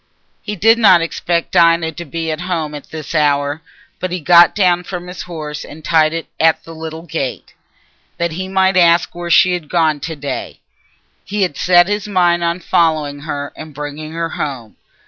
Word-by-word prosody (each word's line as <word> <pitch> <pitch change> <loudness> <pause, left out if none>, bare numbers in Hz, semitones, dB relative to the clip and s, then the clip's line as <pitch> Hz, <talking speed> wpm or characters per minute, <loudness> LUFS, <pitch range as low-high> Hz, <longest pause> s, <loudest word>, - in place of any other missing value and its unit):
He 210 - -5
did 225 +4 +4
not 185 -6 +6
expect 170 0 -2
Dinah 170 -2 +3
to 170 +2 -8
be 165 +2 -4
at 155 +2 -4
home 165 -4 -3
at 145 -2 -9
this 155 -1 -7
hour, 145 -1 +1 0.4
but 185 - -3
he 180 - -2
got 170 +2 +6
down 180 -4 +2
from 180 -1 -6
his 180 0 -8
horse 155 -4 -6
and 155 +1 -12
tied 155 -2 +3
it 165 0 -4
at 160 0 +3
the 165 - -11
little 160 0 -7
gate, 165 -6 -5 0.6
that 170 0 -1
he 185 +4 -5
might 190 0 +2
ask 170 -1 +4
where 175 0 -6
she 180 +2 +5
was 175 -4 -4
gone 160 -4 +1
to 160 +3 -5
day. 140 -2 -6 0.6
He 205 0 -2
had 180 -6 -1
set 175 +2 +4
his 205 0 -2
mind 175 -3 +2
on 170 +2 -1
following 155 -4 +1
her 145 -1 -5
and 155 -2 -10
bringing 150 +1 -6
her 165 0 -2
home. 130 -9 -5
165 Hz, 190 wpm, -17 LUFS, 155-175 Hz, 0.6 s, not